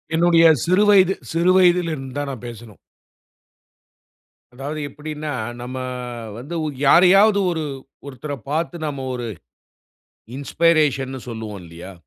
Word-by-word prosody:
என்னுடைய 165 0 +4 0.2
சிறு 185 +4 +3
வயது, 190 -2 +5 0.2
சிறு 170 +3 +2
வயதில் 175 -2 +3
இருந்து 135 -3 -7
தான் 145 -1 -3
நான் 125 -2 -8
பேசனும். 115 -3 -11 1.8
அதாவது 140 +4 -6
எப்பிடின்னா, 150 +1 -6 0.3
நம்ம 125 +1 -6 0.6
வந்து 145 +8 -7
உ - - -2 0.2
யாரையாவது 195 +6 +6
ஒரு 160 -2 -3 0.4
ஒருத்தர 140 +2 -7 0.2
பார்த்து 165 +2 -2
நம்ம 140 -3 -5
ஒரு 120 -1 -4 1.1
இன்ஸ்பைரேஷன்னு 140 -4 +1
சொல்லுவோம் 110 -4 -6
இல்லயா! 85 +3 -11
150 Hz, 115 wpm, -21 LUFS, 130-170 Hz, 1.8 s, யாரையாவது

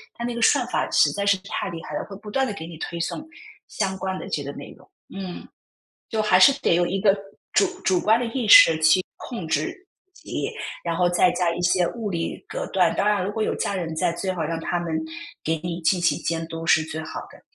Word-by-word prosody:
它 235 - -6
那 240 - -2
个 235 - -4
算 - - +4
法 - - -1
实 - - +4
在 200 - -3
是 200 -1 +3
太 200 - -3
厉 165 -1 -7
害 150 - -6
了， - - -2
会 195 - -8
不 210 0 -10
断 265 +1 +1
地 210 - -3
给 160 - -7
你 165 -1 -9
推 170 +2 -5
送 175 - -3 0.4
相 190 -2 -2
关 190 0 -3
的 - - -7
这 145 - -2
个 140 - -5
内 - - -9
容。 - - -21 0.2
嗯， 190 -2 -7 0.6
就 220 - -1
还 210 -4 +4
是 235 - +9
得 - - +3
有 175 +1 +3
一 195 +1 -2
个 200 0 +4 0.4
主 - - +4 0.2
主 185 -2 +2
观 220 +2 +4
的 245 - -2
意 230 -1 -3
识 165 -5 +9
去 160 +4 +6 0.2
控 210 -10 -7
制 370 - -2 0.3
自 - - -20
己， - - -3 0.3
然 170 -1 -2
后 180 -1 +3
再 175 0 +4
加 175 -1 0
一 175 - -4
些 175 0 +3
物 220 -4 -4
理 170 - -4
隔 - - -4
断。 - - +3
当 - - +1
然 205 -3 +2
如 200 - -2
果 220 - -4
有 - - 0
家 200 - -2
人 165 -3 -3
在， 170 +1 +1
最 185 +2 -3
好 170 -3 -3
让 165 +1 -2
他 175 +1 -2
们 170 -2 -4 0.5
给 160 +1 +1
你 175 0 -4
进 175 +3 +2
行 175 - +2
监 165 0 -2
督， 165 0 -6
是 160 - +5
最 160 0 -5
好 160 - -6
的。 - - -16
180 Hz, 270 characters per minute, -24 LUFS, 165-205 Hz, 0.6 s, 是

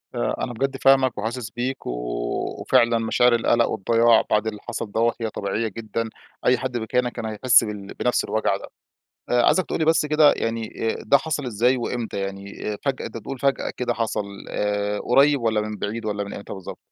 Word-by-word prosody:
آآ - - 0
أنا 120 - -3
بجد 135 +3 -2
فاهمك 135 -1 +4
وحاسس 115 +2 -3
بيك، 130 +2 -4
و - - -1 0.7
وفعلًا 115 0 +3
مشاعر 120 +2 +3
القلق 115 0 +3
والضياع 115 +2 +4
بعد 105 +1 +2
اللي 105 -1 -4
حصل 105 - -4
دوَّة 115 +2 +2
هي 115 - -1
طبيعية 105 +2 -2
جدًا، 115 +1 -4 0.4
أي 125 - +5
حد 125 -1 -3
مكانك 120 +2 0
كان 120 -1 -6
هيحس 115 +3 +4
بال 105 -3 -6
بنفس - - 0
الوجع - - 0
ده. - - -10 0.6
آآ 120 0 +4
عايزك 185 +6 +3
تقول - - -3
لي 160 - +1
بس 160 -1 +3
كده 150 0 +5
يعني 115 0 -2
آآ - - -5
ده 140 +5 +5
حصل 145 0 -3
إزاي 125 +2 +2
وامتى، 120 -3 -3
يعني 100 +2 -5
فجأة 135 -2 -1
أنت - - -6
بتقول 125 +4 -7
فجأة 140 +1 0
كده 120 -1 0
حصل 110 -2 -2 0.2
آآ 105 0 -1
قريّب، 140 +2 +4
والّا 110 -2 +1
من 105 0 -5
بعيد، 110 +3 -4
والّا 105 -1 -2
من 100 - -7
امتى 100 - -7
بالضبط؟ 95 -2 -8
115 Hz, 195 wpm, -23 LUFS, 105-125 Hz, 0.7 s, أي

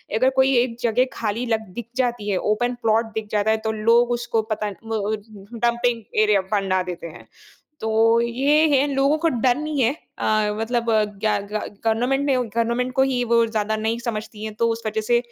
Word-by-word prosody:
अगर 255 +4 +4
कोई 265 0 +4
एक 240 -1 +1
जगह 240 +2 +2
खाली 225 +2 -2
लग 220 -2 -1
दिख 240 0 -6
जाती 240 -5 -1
है, 190 - +1
ओपन 245 +5 0
प्लॉट 225 0 +1
दिख 220 -1 -4
जाता 210 +1 +2
है, 220 - +2
तो 220 0 -2
लोग 230 +3 +3
उसको 235 -2 0
पता 210 -1 -1
ब 215 -1 -2 0.3
डंपिंग 235 0 0 0.2
एरिया 210 -2 +3
बना 190 -2 +1
देते 175 -2 -6
हैं। 160 - -13 0.6
तो 225 +1 +3
ये 275 +7 +2
है 275 +2 +3
लोगों 275 +3 +3
को 330 +1 +1
डर 245 -1 +2
नहीं 305 -2 -2
है 235 +4 +3 0.3
अ, 215 -1 +1
मतलब 235 +1 -1
अ, 215 -1 +3
क्या 210 0 -1
ग - - -8
गा 215 - 0 0.3
गवर्नमेंट 245 +5 +1
ने 275 - +3
गवर्नमेंट 235 +1 -1
को 265 - +3
ही 260 -2 +1
वो 230 0 +5
ज़्यादा 220 -1 -1
नहीं 220 +2 -1
समझती 215 -2 -5
हैं 215 -1 -5
तो 230 - +2
उस 225 - -6
वज़ह 220 0 -1
से 240 +2 +3
230 Hz, 205 wpm, -22 LUFS, 215-245 Hz, 0.6 s, वो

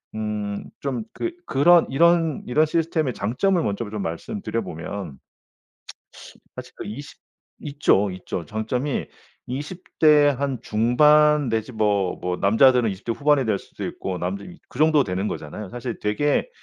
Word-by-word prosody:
음 105 -2 -3 0.2
좀 130 -5 -3
그 345 - -3
그런 170 +5 +5
이런 165 0 +3
이런 150 +6 +3
시스템의 160 -4 0
장점을 165 - 0
먼저 105 +2 -2
좀 105 - -4
말씀드려 115 - -4
보면 85 -2 -7 1.4
사실 - - -9
그 - - -8
20 135 +8 -8 0.4
있죠 140 -9 +1
있죠. 90 -1 -5
장점이 120 - -2 0.4
20 150 +8 -7
대 150 -2 +6
한 135 -2 -2
중반 150 +6 +4
내지 110 +2 -2
뭐 105 -5 0
뭐 90 0 -1
남자들은 120 +4 +4
20 95 +2 -10
대 115 - 0
후반이 145 -1 +2
될 110 -3 +1
수도 - - -8
있고 95 -1 -4
남자 95 +3 -4 0.3
그 - - -12
정도 155 -2 +4
되는 95 +2 -2
거잖아요. 90 +6 -7
사실 120 -1 -6
되게 145 - 0
120 Hz, 255 characters per minute, -23 LUFS, 105-150 Hz, 1.4 s, 대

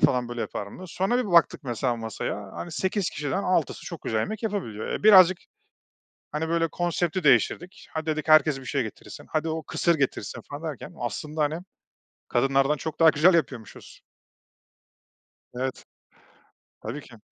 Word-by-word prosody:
falan 125 -1 +3
böyle 120 -1 -5
yapar 100 - -4
mı?“ 100 - -11
diye 185 - -8
sonra 195 +8 0
bir 210 -7 -2
baktık 170 -3 +4
mesela 120 0 -1
masaya, 105 -3 -5
hani, 175 - -6
8 190 +2 -1
kişiden 150 +7 -2
6'sı 180 -5 0
çok 170 -3 -7
güzel 110 - -1
yemek 215 - -4
yapabiliyor. 190 - -3
E, - - -4
birazcık, 190 -4 +8 0.9
hani, 155 +2 -2
böyle, 165 0 +1
konsepti 175 0 -1
değiştirdik, 165 - +2
“Hadi“ 160 0 -4
dedik, 155 0 -2
“Herkes 155 -3 +5
bir - - -12
şey 135 +2 0
getirsin.“, 110 - -9
“Hadi, 160 +1 -1
o 160 0 -2
kısır 170 +2 +1
getirsin.“ 130 -6 -2
falan 145 +2 -6
derken 145 - -9
aslında, 150 +6 -3
hani, 150 +2 0 0.7
kadınlardan 135 +3 +2
çok 160 +3 -6
daha 165 - +8
güzel 165 +5 +5
yapıyormuşuz. 130 -9 -3 1.5
Evet, 130 +1 -4 1.0
tabii 120 +7 -5
ki. 120 -4 -15
155 Hz, 160 wpm, -26 LUFS, 130-175 Hz, 1.5 s, birazcık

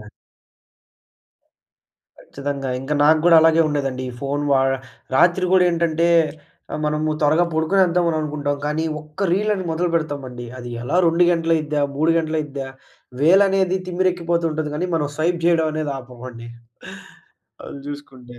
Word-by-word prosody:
ఆ! - - -11 2.2
ఖచ్చితంగా. 140 -1 -5
ఇంక 135 +3 -5
నాకు 155 +1 +5
గూడా 170 -1 +7
అలాగే 160 0 +4
ఉండేదండి. 135 -3 -2
ఈ - - -10
ఫోన్ 140 +1 -2
వాడ 135 0 +3 0.5
రాత్రి 175 +5 +3
గూడా 185 -1 +5
ఏంటంటే, 170 0 +1 0.6
ఆహ్, - - -3
మనము 155 +1 -1
త్వరగా 155 +4 +3
పడుకొనేద్దామని 170 0 +2
అని - - 0
అనుకుంటాం. 145 -1 -2
కానీ 155 +2 -1 0.2
ఒక్క 155 +5 -4
రీలని 205 0 0
మొదలుపెడతామండి. 155 -7 -2
అది 120 -1 -8
ఎలా 125 +9 0
2 170 +2 +3
గంటలయిద్దా, 160 -3 0
3 160 +3 +2
గంటలయిద్దా, 150 -4 -3 0.5
వేలనేది 190 +2 +4
తిమ్మిరెక్కిపోతు 175 -2 0
ఉంటది 155 -1 -3
గానీ, 175 +4 -2
మనం 150 -3 -1
స్వైప్ 170 +2 0
జేయడమనేది 155 -3 +1
ఆపమండి, 120 -2 -10 1.2
అది - - -9
జూసుకుంటే. 130 -4 -10
155 Hz, 125 wpm, -21 LUFS, 145-170 Hz, 2.2 s, గూడా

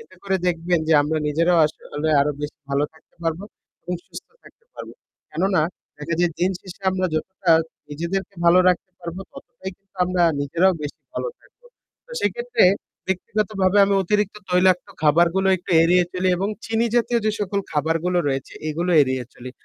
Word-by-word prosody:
এতে 460 - -16
করে 195 -1 0
দেখবেন 175 0 +1
যে - - +4
আমরা 155 +2 -1
নিজেরাও 170 +3 +2
আসলে 155 0 -5
আরও 145 +1 +1
বেশি 145 - -5
ভালো 140 +1 +2
থাকতে 160 - -26
পারবো 165 +4 -2 0.4
এবং 180 - -3
সুস্থ - - -11
থাকতে 465 - -20
পারবো। - - -9 0.4
কেননা 185 +2 +1 0.4
দেখা 160 +3 -3
যায় 175 -1 +3
দিনশেষে 185 +1 -3
আমরা 185 0 0
যতটা 190 +3 -2 0.4
নিজেদেরকে 170 +6 -4
ভালো 170 +2 +6
রাখতে 185 +1 0
পারবো, 170 +2 -6
ততটাই 245 -8 -9
কিন্তু 195 0 -37
আমরা 180 -1 0 0.2
নিজেরাও 170 +6 +2
বেশি 145 - -6
ভালো - - -2
থাকবো। - - -28 0.4
তো - - -21
সেইক্ষেত্রে, 475 - +1 0.4
ব্যক্তিগতভাবে 195 0 0
আমি 195 0 +1
অতিরিক্ত 210 +2 0
তৈলাক্ত 180 0 +3 0.2
খাবারগুলো 170 +5 +3
একটু 180 - -11
এড়িয়ে 180 +2 +4
চলি 185 0 0
এবং 195 +3 -1 0.2
চিনি 225 +1 +1
জাতীয় 240 0 +2
যে 215 - +4
সকল 200 0 -1
খাবারগুলো 165 +4 0
রয়েছে, 135 -1 -3 0.2
এগুলো 170 +4 -1
এড়িয়ে 130 -1 -1
চলি। 125 +1 -9
180 Hz, 160 wpm, -22 LUFS, 165-195 Hz, 0.4 s, ভালো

